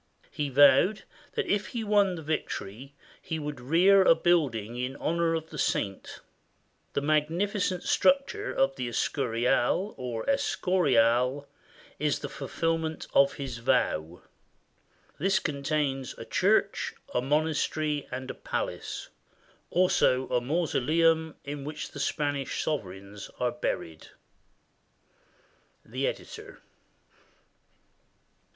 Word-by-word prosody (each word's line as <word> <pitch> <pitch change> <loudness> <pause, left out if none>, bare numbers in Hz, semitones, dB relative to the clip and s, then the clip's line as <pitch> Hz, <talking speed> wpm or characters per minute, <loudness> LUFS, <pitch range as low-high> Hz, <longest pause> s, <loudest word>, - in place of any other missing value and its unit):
He 145 -1 -2
vowed 145 +9 +5 0.3
that 450 -3 -1
if 205 - 0
he 225 - -1
won 205 -3 +3
the 165 - -8
victory, 140 -4 -4 0.3
he 160 - -4
would 150 -4 -5
rear 180 +9 +5
a 175 -3 +6
building 140 -11 +1
in 125 +2 -3
honor 165 +1 0
of 160 0 -5
the 150 - -7
saint. 95 -1 -2 0.7
The - - 0
magnificent 175 +6 0
structure 280 +10 +2
of 135 0 +1
the 125 -2 -3
Escurial, 125 - 0
or 120 -3 -4
Escorial, 140 - +2 0.5
was 150 -1 +1
the - - -6
fulfillment 160 +2 -2
of 140 0 +5
his 130 -4 -6
vow. 85 -6 0 1.0
This 195 +5 +2
contains 140 -3 -2
a - - -8
church, - - +1 0.2
a 125 - +1
monastery, 150 +1 0
and 130 +1 -5
a - - -8
palace, - - -4 0.6
also 130 -8 +3
a 125 - +1
mausoleum 160 +2 +1
in 145 0 -6
which 150 +1 -6
the 145 - -8
Spanish 145 -1 -1
sovereigns 100 -7 -5
are 125 -1 +1
buried. 80 -9 -4 1.8
The - - -2
Editor. - - -7
145 Hz, 110 wpm, -28 LUFS, 125-165 Hz, 1.8 s, a